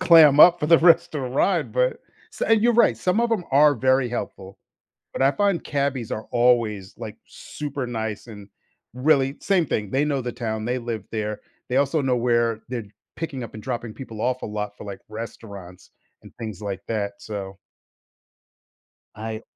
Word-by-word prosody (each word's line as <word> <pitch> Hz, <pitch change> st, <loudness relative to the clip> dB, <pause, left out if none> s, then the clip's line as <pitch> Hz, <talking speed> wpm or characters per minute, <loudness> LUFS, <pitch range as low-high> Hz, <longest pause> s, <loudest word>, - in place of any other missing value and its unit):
clam 160 Hz, -5 st, +7 dB
up 175 Hz, +1 st, +8 dB
for 150 Hz, -, 0 dB
the 165 Hz, +1 st, +6 dB
rest 165 Hz, -1 st, +4 dB
of 145 Hz, -, -2 dB
the 125 Hz, -, -3 dB
ride, 135 Hz, +10 st, +1 dB
but -, -, +1 dB, 0.3 s
so -, -, -3 dB
and 225 Hz, -1 st, +4 dB
you're 240 Hz, 0 st, +4 dB
right, 175 Hz, -, +4 dB
some 180 Hz, -, +1 dB
of 235 Hz, -, +2 dB
them 215 Hz, -6 st, 0 dB
are 145 Hz, +1 st, +6 dB
very 130 Hz, +1 st, +2 dB
helpful, 95 Hz, -5 st, -6 dB, 0.5 s
but -, -, -6 dB
I 135 Hz, -, +5 dB
find 200 Hz, -2 st, +1 dB
cabbies 140 Hz, -5 st, -2 dB
are 110 Hz, -, -4 dB
always, 115 Hz, -5 st, +1 dB
like, -, -, -8 dB
super 140 Hz, -3 st, -6 dB
nice 110 Hz, -1 st, -4 dB
and 105 Hz, -3 st, -11 dB, 0.5 s
really 135 Hz, +1 st, +2 dB
same 185 Hz, -5 st, +2 dB
thing, 105 Hz, -6 st, -2 dB
they 135 Hz, +5 st, +1 dB
know 140 Hz, -3 st, -1 dB
the 120 Hz, -, -4 dB
town, 110 Hz, -3 st, -4 dB
they 125 Hz, +2 st, -1 dB
live 115 Hz, -4 st, -5 dB
there, 105 Hz, -1 st, -3 dB, 0.3 s
they 125 Hz, -, -1 dB
also 140 Hz, +3 st, +2 dB
know 130 Hz, -3 st, +1 dB
where 120 Hz, -2 st, +1 dB
they're 120 Hz, -3 st, -4 dB, 0.3 s
picking 150 Hz, -5 st, -4 dB
up 115 Hz, -, -8 dB
and 110 Hz, -, -8 dB
dropping 120 Hz, -3 st, -4 dB
people 115 Hz, -5 st, -9 dB
off 130 Hz, +1 st, -1 dB
a -, -, -3 dB
lot 105 Hz, -1 st, -5 dB
for, -, -, -10 dB
like, 100 Hz, -1 st, -7 dB
restaurants 100 Hz, -5 st, -9 dB, 0.3 s
and -, -, -14 dB
things 110 Hz, -4 st, -7 dB
like 100 Hz, -2 st, -4 dB
that, 100 Hz, -2 st, -3 dB
so 100 Hz, -3 st, -6 dB, 1.6 s
I 110 Hz, +1 st, -5 dB
125 Hz, 185 wpm, -23 LUFS, 110-145 Hz, 1.6 s, up